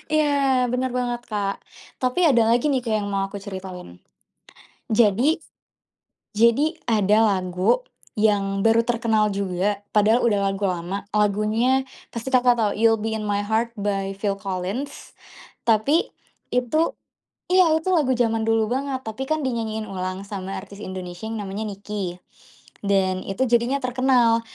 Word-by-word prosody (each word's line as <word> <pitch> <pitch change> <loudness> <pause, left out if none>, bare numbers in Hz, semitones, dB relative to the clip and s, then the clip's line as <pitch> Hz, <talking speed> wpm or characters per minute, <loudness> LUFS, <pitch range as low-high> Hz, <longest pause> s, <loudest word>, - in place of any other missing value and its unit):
Iya 280 -4 +2
bener 250 +1 -1
banget 245 -1 -2
Kak. 200 -2 -2 0.4
Tapi 255 +5 0
ada 240 -6 +4
lagi 240 +5 +2
nih 260 -2 0
Kak 230 -3 -1
yang - - -4
mau 195 -1 -1
aku 200 0 -7
ceritain. 185 - -8 0.9
Jadi 235 +8 +3 0.9
jadi 235 +9 +3
ada 215 -1 +3
lagu 185 - +1 0.3
yang 200 -2 +1
baru 225 0 +5
terkenal 230 -2 +1
juga, 200 0 -1
padahal 215 +3 +3
udah 210 -4 +2
lagu 195 +1 -4
lama, 185 +1 -2
lagunya 215 +5 +2 0.2
pasti 235 +3 -6
Kakak 245 -1 +4
tau 215 -3 +2
"You'll 225 +1 +3
Be 220 +1 -2
in 220 -1 -2
My 205 0 0
Heart" 225 +3 -1
by 195 -1 -2
Phil 200 0 -1
Collins. 195 +8 -5 0.6
Tapi 230 +9 +3 0.4
itu 250 +6 +1 0.7
iya, 365 -3 +5
itu 320 +4 -3
lagu 300 -7 +3
zaman 225 -2 0
dulu 225 -1 +2
banget, 265 +1 -2
tapi 225 +4 -5
kan 310 +1 -1
dinyanyiin 225 -4 -2
ulang 185 0 -4
sama 195 -1 -6
artis 200 +1 -9
Indonesia 185 -1 -7
yang 220 -1 -4
namanya 200 +2 -4
NIKI 195 -3 -5 0.7
dan 190 -2 +1
itu 195 +6 -2
jadinya 245 +3 +1
terkenal. 250 -2 +3
220 Hz, 145 wpm, -23 LUFS, 200-250 Hz, 0.9 s, baru